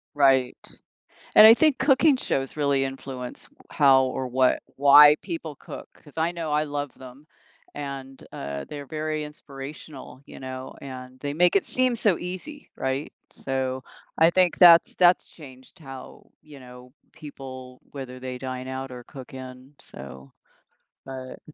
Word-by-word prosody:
Right, 135 -3 +3 0.8
and 215 - +10
I 225 - +10
think 305 +2 +2
cooking 275 +2 +4
shows 135 - -3
really 140 -2 +1
influence 135 -2 -7 0.2
how 135 -3 +5
or 130 0 -3
what 130 +1 +2
why 145 +2 +8
people 160 -3 -6
cook, - - -10
'cause 145 -1 -19
I 165 +2 +1
know 165 -3 -4
I 150 +1 +2
love 145 -2 -4
them, 130 +3 -14 0.5
and, 135 -2 -7
uh, 70 0 -6
they're 145 -1 -8
very 155 +1 -3
inspirational, 140 -2 -10
you - - -12
know, 130 0 -7
and 130 -1 -10
they 145 - -3
make 180 +3 +3
it - - +2
seem 255 -1 0
so 210 -6 +1
easy, 185 - -8
right? 135 +2 -3 0.2
So, 130 -1 -3 0.4
I 165 +1 +6
think 180 0 +2
that's 170 -2 +7
that's 180 0 +4
changed 130 +1 -15
how, 135 -4 -12
you 150 -3 -14
know, 125 0 -14 0.2
people 130 -3 -11
whether 130 -2 -8
they 130 -1 -6
dine 130 0 -6
out 130 0 -5
or 125 -1 -9
cook 130 -2 -12
in. 130 +1 -11
So, 65 0 -12 0.7
but 130 -1 -8
135 Hz, 150 wpm, -25 LUFS, 130-155 Hz, 0.8 s, and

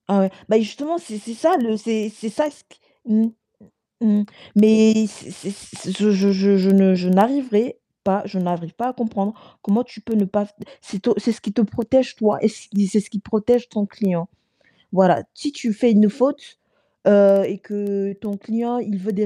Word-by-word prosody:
Ah 200 +1 +2
ouais. 190 0 +1 0.2
Bah 220 - +5
justement, 285 +10 -4
c'est 220 -10 -10
c'est 210 +3 -10
ça 325 +11 +2
le 225 -3 -1
c'est 215 0 -3
c'est 220 +1 -7
ça 300 +8 -1
ce 295 - -20
que - - -27 0.4
mmh? 225 +1 +2 0.7
Mmh, 210 -2 +3 0.3
mais 220 +1 +6
c'est 200 - -15
c'est 190 +1 -9
c'est 190 -2 -10
je 210 +1 +3
je 200 0 +3
je 195 +1 +3
je 190 0 +2
ne 195 -1 +6
je 180 0 -2
n'arriverai 235 - +2 0.3
pas 195 +1 +1
je 195 -2 -5
n'arrive 175 -1 -4
pas 235 +2 -4
à - - -6
comprendre 220 -4 -3 0.3
comment 215 +4 +1
tu 245 -3 -16
peux 225 +2 -6
ne 210 - +3
pas 205 +2 -1
f 205 - -20 0.3
c'est 200 - -9
to 230 0 +1
c'est 225 +3 0
ce 230 - -16
qui 210 - -5
te 220 - -3
protège 240 +3 0
toi 210 -2 +1
et 220 - +4
c 220 0 -9 0.2
c'est 210 +2 +1
ce 200 - -15
qui 205 - -5
protège 230 +4 0
ton 210 -4 -3
client. 185 -4 -3 0.6
Voilà, 185 -2 +4
si 295 - -6
tu 265 -7 -3
fais 235 +3 +2
une 210 0 +6
faute, 275 +6 -2 0.5
heu 200 -1 +7
et 190 - -5
que 200 0 -4
ton 200 +1 -7
client, 235 +4 -3
il 210 -4 -4
veut 195 +4 -4
des 210 +1 -1
210 Hz, 210 wpm, -20 LUFS, 200-230 Hz, 0.7 s, heu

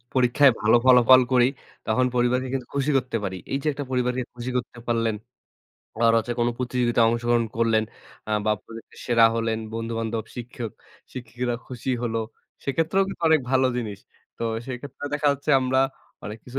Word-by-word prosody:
পরীক্ষায় 130 +2 +5
ভালো 110 +3 +5
ফলাফল 130 0 +7
করি 125 -1 +5 0.4
তখন 125 +4 +2
পরিবারকে 125 +1 +1
কিন্তু 130 -2 -3
খুশি 140 +1 0
করতে 125 -2 -3
পারি। 95 -1 -3 0.2
এই 135 - +1
যে, - - -7
একটা 145 0 -5
পরিবারকে 125 0 0
খুশি 120 +1 -4
করতে 120 -1 -4
পারলেন 115 -2 0 0.8
আবার 115 0 +4
হচ্ছে 115 +2 -2
কোনো 120 - +2
প্রতিযোগিতায় 120 -2 +2
অংশগ্রহণ 120 0 +1
করলেন। 115 -1 +2 0.4
আ - - -3
বা 110 - +2
প্রতিযোগিতায় 115 0 -12
সেরা 115 -2 +5
হলেন, 115 -1 -1
বন্ধু-বান্ধব 115 -1 -3 0.9
শিক্ষক-শিক্ষিকারা 120 0 -4
খুশি 125 +1 -5
হলো। 115 -1 -1 0.5
সেক্ষেত্রেও 165 +7 +1
কিন্তু 185 - -8
অনেক 160 -1 +5
ভালো 130 0 +3
জিনিস। 110 -5 -4 0.4
তো - - -5 0.2
সেক্ষেত্রে 135 +3 -7
দেখা 145 0 -1
যাচ্ছে 140 +2 -3
আমরা 130 0 +1 0.5
অনেক 105 +2 -6
কিছু 130 +2 -6
120 Hz, 160 wpm, -24 LUFS, 115-130 Hz, 0.9 s, ফলাফল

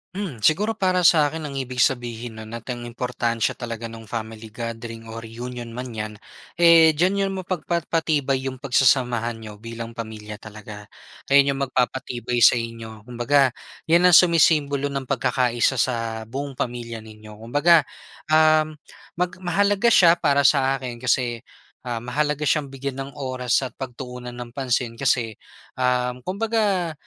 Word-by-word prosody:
Hmm, 170 - -5
siguro 210 - +3
para 185 -2 +3
sa'kin 155 -1 +2
ang 140 - -7
ibig 130 -2 -4
sabihin 120 -2 0
no'n 110 0 -9
at 115 - -25
ang 120 -2 -4
importansya 120 -1 -2
talaga 115 -1 -6
nung 115 0 -10
family 110 0 -7
gathering 115 0 -7
o 110 - -8
reunion 120 +1 -7
man 125 +2 -6
'yan, 105 0 -4 0.5
eh, 165 -2 +7
diyan 185 +6 +1
'yon 195 - -1
mapagpapatibay 165 -6 -1
'yong 130 -1 -5
pagsasamahan 125 -3 +2
niyo 110 -2 -9
bilang 115 +1 -8
pamilya 110 -2 -7
talaga. 105 0 -10 0.5
Ayan 140 0 +5
'yong 135 - -2
magpapatibay 125 -2 -1
sa 120 - +7
inyo. 115 -1 -8
Kumbaga, 125 +2 +2 0.3
'yan 170 +2 +4
ang 180 - +6
sumisimbolo 150 -5 +4
ng 135 -2 -4
pagkakaisa 125 -1 +1
sa 115 -3 -1
buong 135 +2 -6
pamilya 120 -1 -4
ninyo. 110 -1 -13
Kumbaga, 145 +6 +3 0.4
uhm, 155 0 +4 0.4
mag 180 +1 -1
mahalaga 200 +5 +1
siya 175 -7 +6
para 140 0 +3
sa 135 -1 +4
akin 125 -3 -6
kasi, 120 -1 0 0.5
ah, 120 -1 -3
mahalaga 150 +4 -1
siyang 150 -1 +1
bigyan 135 0 -6
ng 135 +1 -5
oras 130 -2 -1
at 130 - -4
pagtuunan 125 -1 -7
ng 120 -1 -8
pansin, 125 -3 -2
kasi, 120 -5 0 0.4
um, 125 0 0
kumbaga 200 - 0
125 Hz, 145 wpm, -23 LUFS, 115-150 Hz, 0.5 s, eh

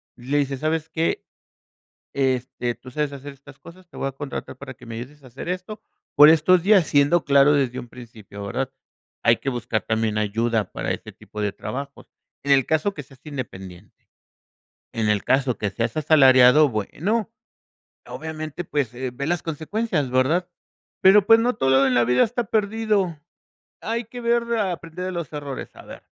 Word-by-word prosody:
le 130 +4 -2
dices: 140 -2 -1
"¿Sabes 160 +1 -1
qué?, 160 +1 -1 0.9
este, 130 -2 -1
tú 130 - -13
sabes 150 +1 -2
hacer 140 0 -9
estas 140 0 -17
cosas. 180 +2 -15
Te - - -18
voy - - -2
a - - -3
contratar 140 +1 -7
para 135 -2 -9
que 125 0 -16
me 115 - -6
ayudes 135 +5 -9
a - - -13
hacer 130 +7 -8
esto, 185 +4 -5 0.3
por 150 +1 +9
estos 165 +3 +4
días", 195 -3 +5
siendo 145 +4 +3
claro 140 0 +5
desde 130 -3 0
un 125 - -9
principio, 110 -4 -11
¿verdad? 130 +6 -3 0.5
Hay 115 0 +4
que 135 - -3
buscar 120 -3 -2
también 110 -1 -1
ayuda 110 0 0
para - - -3
ese - - -6
tipo 105 - -9
de 105 -1 0
trabajos, 140 +7 -7 0.4
en 140 - 0
el 135 -2 +5
caso 160 +6 0
que 150 - -8
seas 130 0 -19
independiente. 95 -11 -9 0.9
En 110 -2 0
el 105 -1 +1
caso 130 -2 +1
que 105 - -1
seas 115 +5 -3
asalariado, 135 -1 +6
bueno, 185 - -2 0.8
obviamente, 155 +1 -6
pues, 145 -7 -2
eh, 130 +1 -4
ve 140 +3 -5
las 175 +1 -1
consecuencias, 165 - -2
¿verdad?, 145 +8 +1 0.5
pero 195 +1 +6
pues, 225 +1 +7
no 245 +2 +1
todo 135 0 +3
en 130 - +1
la 120 -1 +4
vida 125 +1 +4
está 240 +2 -2
perdido. 210 -5 0 0.6
Hay 230 +2 -2
que 245 +2 -9
ver 235 0 +2
a 200 -4 0
aprender 170 +1 -7
de 185 - -3
los 170 -4 -5
errores, 145 -3 -6
a - - -13
ver, - - -11
140 Hz, 180 wpm, -23 LUFS, 125-170 Hz, 0.9 s, por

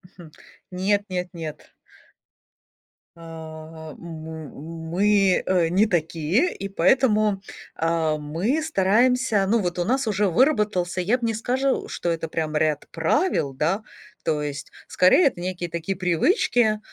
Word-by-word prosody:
Хм. 170 -4 -13 0.4
Нет, 200 +3 +1
нет, 180 -1 -3
нет. 160 -3 -8 1.4
А, 160 -1 -10
м, 160 -1 -8 0.4
мы, 195 +1 +3
э, 175 -3 +2
не 195 +5 +3
такие, 170 - 0
и 195 - -5
поэтому, 210 +1 +2 0.3
а, 165 -1 0
мы 170 - -1
стараемся, 235 -3 +2
ну, 230 +3 +3
вот 180 -2 -2
у 175 - +1
нас 260 +4 0
уже 205 -1 +1
выработался, 210 - +1
я 220 +8 +1
б 235 - -2
не 225 -1 0
скажу, 260 +4 -1
что 175 - -3
это 165 -1 -2
прям 155 -1 -3
ряд 150 -1 0
правил, 165 - 0
да. 170 +10 -1 0.4
То 155 -2 0
есть, 140 -2 -5 0.2
скорее, 185 - +5
это 175 - -3
некие 180 -1 -4
такие 170 +4 -3
привычки, 215 - +2
180 Hz, 135 wpm, -24 LUFS, 160-215 Hz, 1.4 s, скорее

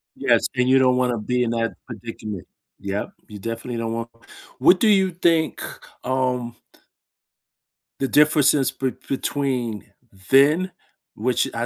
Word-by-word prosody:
Yes. - - +2
And 125 0 +2
you 135 +1 +6
don't 125 -1 +3
wanna 125 -2 +1
be 125 +3 0
in 115 - -1
that 115 -1 -1
predicament. 110 -4 -7 0.3
Yep. 100 +1 -3 0.2
You 105 -1 -10
definitely 115 +3 -5
don't 115 0 -2
want 115 0 -4 0.5
what 180 +8 +5
do 225 - +3
you 195 -3 +4
think, 165 -2 +1 0.4
um 125 -2 -1 1.4
the 135 - 0
differences 150 -2 +4
be 130 -1 -2 0.2
between 130 -6 -2 0.4
then, 150 +8 +4 0.4
which 120 +2 0
I 115 +1 -1
125 Hz, 135 wpm, -22 LUFS, 115-140 Hz, 1.4 s, you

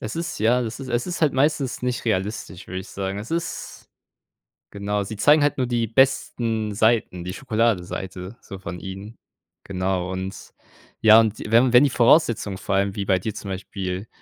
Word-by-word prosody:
Es 110 - -5
ist 170 +1 -4
ja, 120 +4 +3
es 115 0 -4
ist 135 - -7
es 120 +4 0
ist 175 -2 -4
halt 150 - +4
meistens 135 -1 0
nicht 125 -1 -2
realistisch, 100 -3 -3
würde 95 +1 -5
ich - - -11
sagen. 95 0 -4
Es 110 +7 -8
ist 170 0 -4 0.8
genau, 100 0 -2
sie 105 +2 -7
zeigen 145 +5 +5
halt 145 - +1
nur 130 -2 0
die 120 -2 0
besten 115 -3 +1
Seiten, 110 -5 +1
die 90 - -4
Schokoladenseite 100 -4 -2
so 100 - -9
von 90 -2 -7
ihnen, 95 +4 -8 0.5
genau, 95 -1 -2
und 95 +1 -6 0.5
ja, 110 0 +8
und 110 -2 +1
wenn 120 +2 +5
wenn 125 - +8
die 145 - +4
Voraussetzungen 120 - +3
vor 95 - -2
allem 100 0 +1
wie 100 - -2
bei 95 -1 +2
dir 105 +4 -4
zum 100 - -7
Beispiel, 95 +1 -5
110 Hz, 185 wpm, -23 LUFS, 95-120 Hz, 0.8 s, ja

